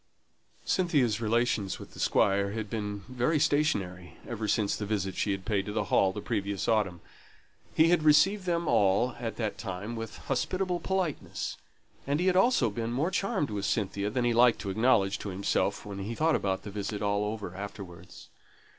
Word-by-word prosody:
Cynthia's 140 - +1
relations 115 -3 0
with - - -11
the - - -12
Squire 100 0 +2
had 110 -2 -4
been 105 -2 -3
very 125 +5 +1
stationary 105 - 0
ever 110 -2 -3
since 105 0 +1
the 105 - -4
visit 100 -3 -1
she 105 - 0
had 95 -1 -4
paid 100 -3 0
to - - -3
the 110 - 0
Hall 95 - +4
the 105 - -6
previous 100 -1 -2
autumn. 100 -6 +1 0.7
He 160 +1 +5
had 175 -1 +4
received 180 +6 +4
them 170 -1 0
all 100 +5 +3
at 115 -2 -4
that 110 -3 -3
time 100 +2 -5
with 115 -1 -6
hospitable 185 -1 -1
politeness, 185 -6 -2 0.5
and 145 +2 +1
he 180 - 0
had 185 - +3
been 115 +1 -3
more 145 +9 0
charmed 195 - -1
with 100 -1 -2
Cynthia 100 -1 -1
than 120 +3 -1
he 120 - +2
liked 120 0 +5
to 100 - -3
acknowledge 105 -2 +2
to 105 - -5
himself 95 +1 -1
when 100 -1 -6
he 105 +4 -4
thought 105 -12 +1
the 100 - -7
visit 105 +1 -4
all 100 0 +1
over 105 -3 -4
afterwards. 95 -3 -9
110 Hz, 180 wpm, -29 LUFS, 100-145 Hz, 0.7 s, He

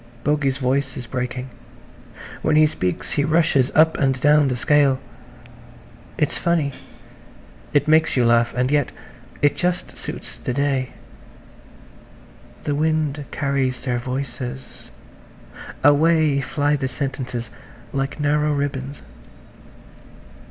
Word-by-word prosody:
Bogey's 145 -3 +1
voice 135 0 -1
is 125 - -6
breaking. 125 +1 -4 0.9
When 155 - +2
he 155 0 +7
speaks 90 - -2
he 145 - +1
rushes 155 -4 +2
up 160 +1 +4
and 135 -2 +1
down 145 +1 +5
the 130 - 0
scale. 140 +1 +3 1.2
It's 150 -2 0
funny–it 145 -1 -4
makes 155 -2 +3
you 125 - +4
laugh–and 120 +2 +2
yet 145 -3 +1 0.5
it 145 - +4
just 180 0 -2
suits - - -7
the 125 - -4
day. 135 -2 0 1.7
The 145 - -1
wind 155 -1 0
carries 135 -2 -1
their 125 -2 -1
voices–away 135 - -1
fly 145 0 0
the 135 -2 -2
sentences 125 -3 -4 0.4
like 135 +1 -2
narrow 150 +1 +2
ribbons. 140 -1 -3
140 Hz, 105 wpm, -22 LUFS, 130-150 Hz, 1.7 s, he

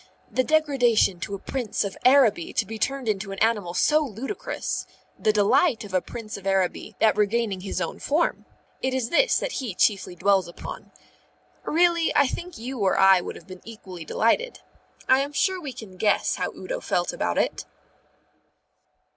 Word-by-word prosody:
The 255 - +1
degradation 260 - +2
to 200 +2 -4
a - - -5
Prince 240 +1 -3
of 200 - -5
Araby 255 -10 +4
to - - +1
be 220 +2 -7
turned 270 +1 -2
into 195 -1 -2
an 195 - -6
animal 205 -5 0
so 305 +10 +4
ludicrous, 270 - -4 0.3
the 215 - +3
delight 220 - +3
of 200 -2 -10
a 185 - +2
Prince 220 -4 -7
of 195 -1 -8
Araby 190 -2 -1
at 220 - +4
regaining 210 -2 0
his 190 -1 -4
own 170 - -4
form, 310 +4 0 0.4
it 260 0 -1
is 245 -3 -2
this - - +4
that - - -2
he 245 - -4
chiefly 195 -3 +1
dwells 195 0 +2
upon. 175 - -9 0.7
Really, 340 0 +3
I - - +5
think 345 +6 -5
you 250 +2 -6
or 195 -2 +2
I 195 -1 +6
would - - -6
have - - -13
been 185 -1 -11
equally 190 -6 -10
delighted. 230 - 0 0.5
I 260 - +5
am 285 +1 -2
sure 375 +4 +1
we 285 -5 -5
can 200 -6 -11
guess 205 +3 +1
how - - -1
Udo - - -5
felt - - -1
about - - -2
it. - - 0
225 Hz, 180 wpm, -25 LUFS, 195-275 Hz, 0.7 s, I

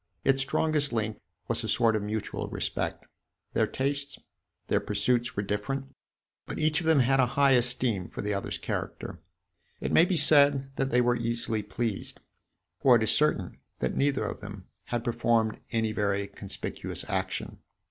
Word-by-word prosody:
Its 135 0 +3
strongest 145 +1 +1
link 110 -2 -2 0.3
was - - 0
a - - -3
sort 115 -2 +2
of 105 - 0
mutual 105 +1 -3
respect. - - -3 0.5
Their - - +2
tastes, 140 +1 -1 0.5
their - - +2
pursuits 120 +4 0
were 100 - 0
different; 130 +7 -3 0.5
but - - -5
each 155 0 +2
of 165 - -4
them 160 -4 +5
had 135 +2 +3
a 130 - +4
high 140 -1 +5
esteem 120 -6 +2
for - - -6
the 105 0 -1
other's 100 - -3
character. - - -5 0.6
It - - -3
may 165 - +6
be 180 -1 0
said 140 -3 +5
that 135 0 0
they 125 -1 +3
were 120 0 +2
easily 115 -2 -2
pleased; 115 -1 -3 0.6
for 130 -2 +6
it 115 - +3
is 110 - +3
certain 130 -12 +1 0.2
that 65 - -2
neither 140 -1 +1
of - - -5
them 100 -2 -9 0.2
had 120 -1 -3
performed 115 -2 +1
any 110 -2 0
very 100 -2 0
conspicuous 100 0 -5
action. - - -3
120 Hz, 170 wpm, -28 LUFS, 105-135 Hz, 0.6 s, may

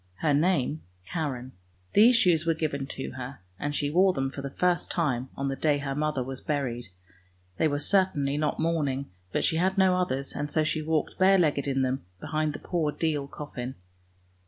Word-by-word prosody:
Her 150 -2 +3
name 155 -2 +2 0.2
Karen. 130 - -3 0.4
These 235 +4 +7
shoes 175 -8 +4
were 165 -1 +1
given 145 -4 -2
to 135 - -5
her, 130 +1 -7 0.2
and 145 0 -2
she 145 0 0
wore 185 +3 +4
them 135 -2 -1
for 140 - -6
the 140 - -4
first 180 +5 +1
time 130 -7 0
on 140 - -1
the 135 - -1
day 150 0 +2
her 140 -1 -3
mother 150 -2 0
was 130 +1 -6
buried; 130 -6 -2 0.7
they 160 - +3
were 145 -1 0
certainly 145 -5 +2
not 150 0 -1
mourning, 145 - 0 0.2
but - - 0
she 160 - +2
had 190 +3 +1
no 190 -1 +5
others, 140 -7 -1
and 145 +1 -3
so 155 +1 +2
she 155 0 0
walked 155 -1 -1
bare 190 +1 +6
legged 145 -5 +2
in 135 -1 +1
them 130 +1 -1 0.2
behind 155 - -1
the - - -5
poor 160 -3 -1
deal 150 -3 -1
coffin. 130 -3 -6
150 Hz, 195 wpm, -27 LUFS, 135-165 Hz, 0.7 s, These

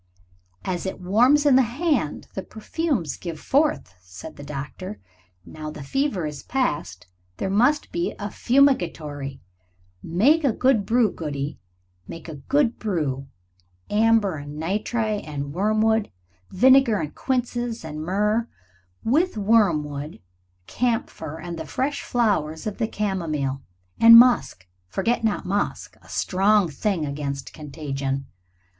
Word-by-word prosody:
"As 185 0 -2
it 190 - -5
warms 245 +11 +4
in 280 -3 +6
the 265 - +7
hand 250 - -1
the 190 - -4
perfumes 220 - -3
give 165 -3 -6
forth," 290 - +1
said 90 0 -11
the - - -11
doctor. 150 +8 -7 0.5
"Now 155 -1 -7
the 150 -1 -8
fever 210 - -1
is 150 -1 -5
past 145 - -2 0.3
there 190 - -2
must 250 +9 +2
be 345 +2 -2
a 205 0 -5
fumigatory. 165 - +1 0.6
Make 265 - +3
a 270 -5 +3
good 250 -6 +2
brew, 230 -3 +3
Goody, 145 -3 -5 0.5
make 165 - -9
a 160 - -6
good 260 - +1
brew 150 -10 -2 0.6
amber 215 -4 +3
and 145 +1 -8
nitre 210 +5 -1
and 140 -2 -5
wormwood 215 +3 +2 0.4
vinegar 255 +2 +5
and 150 - -4
quinces 240 -5 -2
and 155 -1 -6
myrrh 210 +7 0 0.6
with 305 +4 +1
wormwood, 160 -9 +1 0.5
camphor, 165 - -2
and 170 -1 -6
the 160 - -6
fresh 280 - -2
flowers 160 -10 0
of 215 +1 -4
the 225 - +1
camomile. 160 -11 -2 0.4
And 230 0 +10
musk 240 - +4 0.2
forget 225 - -1
not 220 -2 0
musk 200 +3 -2
a - - -19
strong 195 0 +2
thing 170 +1 -1
against 140 -1 -5
contagion. 140 -3 -4
195 Hz, 130 wpm, -24 LUFS, 150-235 Hz, 0.6 s, And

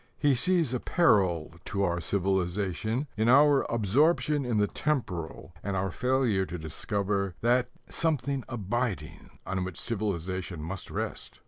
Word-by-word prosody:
He 145 -2 +3
sees 165 0 +2
a 125 - 0
peril 95 - +2
to 100 0 -1
our 85 -2 0
civilization 95 - -1
in 110 +2 +2
our 145 +1 +5
absorption 145 - +2
in 120 -3 0
the 105 - +4
temporal 90 - -3
and 100 -1 -3
our 95 0 -1
failure 125 -4 +1
to 90 - -5
discover 100 +4 -2
that 120 +2 +3 0.2
"something 140 -4 0
abiding" 110 -6 -3 0.2
on 95 0 -2
which 90 -3 -5
civilization 95 -5 -2
must 90 +6 -5
rest. - - -5
105 Hz, 135 wpm, -28 LUFS, 95-125 Hz, 0.2 s, our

